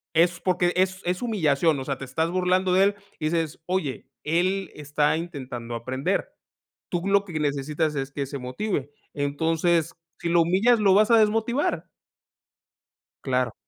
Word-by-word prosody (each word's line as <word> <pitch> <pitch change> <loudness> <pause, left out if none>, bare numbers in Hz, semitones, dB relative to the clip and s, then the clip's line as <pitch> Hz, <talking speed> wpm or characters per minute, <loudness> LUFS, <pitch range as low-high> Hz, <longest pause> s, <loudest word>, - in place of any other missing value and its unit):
Es 175 +2 +3
porque, 180 -1 +1
es 185 +1 +1
es 180 +1 -1
humillación, 160 - +2
o 130 - -5
sea, 140 -2 -2
te - - -8
estás 160 +6 -1
burlando 185 0 +2
de 190 - +5
él 200 +1 +2 0.2
y - - -3
dices: 160 -1 -1
"Oye, 180 -7 -2 0.2
él 185 +5 0
está 150 +1 +1
intentando 130 -8 -6
aprender, 130 +3 -2 0.6
tú 175 - -1
lo 200 0 +4
que 170 -5 -4
necesitas 150 +2 -1
es 135 0 -3
que 140 0 -3
se 140 +1 -6
motive. 140 +3 -3 0.2
Entonces, 160 +3 +1 0.3
si 170 - -3
lo 170 0 +4
humillas, 210 +7 +3
lo 195 -2 +4
vas 215 +3 +4
a 230 - +7
desmotivar". 220 - +1 1.4
Claro. 125 -1 0
165 Hz, 160 wpm, -25 LUFS, 145-185 Hz, 1.4 s, a